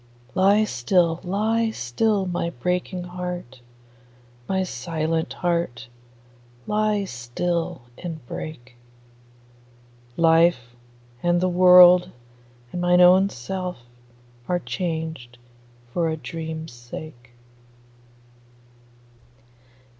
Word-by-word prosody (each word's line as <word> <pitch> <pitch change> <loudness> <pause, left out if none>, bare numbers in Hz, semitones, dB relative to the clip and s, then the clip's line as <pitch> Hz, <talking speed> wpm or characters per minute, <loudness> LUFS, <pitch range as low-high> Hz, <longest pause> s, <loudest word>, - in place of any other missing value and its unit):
Lie 200 +3 +4
still, 170 - +1
lie 220 +5 0
still, 200 - 0
my 175 -2 -2
breaking 180 +5 -3
heart; 180 -8 -6 0.9
My 190 0 +1
silent 160 +1 -2
heart, 170 -9 -2 0.8
lie 210 -1 +1
still 165 +3 -3 0.2
and 165 -6 -7
break: 125 -2 -8 1.4
Life, 165 -7 +3 0.5
and 175 0 +2
the 185 - +1
world, 180 0 +7 0.6
and 175 - -4
mine 180 0 +4
own 185 +2 +6
self, 180 +7 -5 0.7
are 180 - +1
changed 160 -8 -5 0.6
For 170 -2 +1
a 160 - -2
dream's 160 0 -6
sake. 120 +1 -11
175 Hz, 85 wpm, -23 LUFS, 155-180 Hz, 1.4 s, world